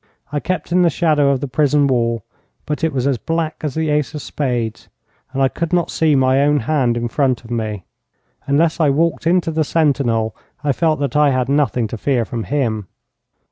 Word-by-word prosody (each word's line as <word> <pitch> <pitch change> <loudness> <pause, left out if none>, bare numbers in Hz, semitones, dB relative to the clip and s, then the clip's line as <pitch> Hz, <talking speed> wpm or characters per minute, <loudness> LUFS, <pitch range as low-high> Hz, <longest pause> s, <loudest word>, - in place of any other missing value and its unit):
I 145 - -1
kept 175 +1 -3
in 180 +1 +4
the 175 - +4
shadow 150 -3 +2
of 135 -2 +1
the 140 - -2
prison 145 +2 +2
wall, 115 -4 0 0.4
but 150 +1 -3
it 160 - +2
was 130 -3 -1
as 135 -4 +1
black 165 -1 -2
as 150 -4 -3
the 160 -1 0
ace 150 0 0
of 150 - -5
spades, 120 -6 -3 0.4
and 135 +1 0
I - - +5
could 165 +4 -4
not 175 -2 +1
see 155 -2 +2
my 130 0 +3
own 145 0 +3
hand 125 -2 +1
in 120 0 -1
front 130 0 0
of 115 - -11
me. 110 -5 -3 0.6
Unless 155 +4 +2
I 155 -3 +4
walked 160 +3 +1
into 175 -1 +2
the 160 0 +1
sentinel 135 -8 +1 0.3
I 145 - +2
felt 155 +2 +1
that 140 -2 -2
I 150 -1 +5
had 130 -1 0
nothing 135 -5 +1
to 115 - -6
fear 125 -3 +1
from 115 0 -5
him. 115 -8 -1
140 Hz, 210 wpm, -19 LUFS, 125-155 Hz, 0.6 s, I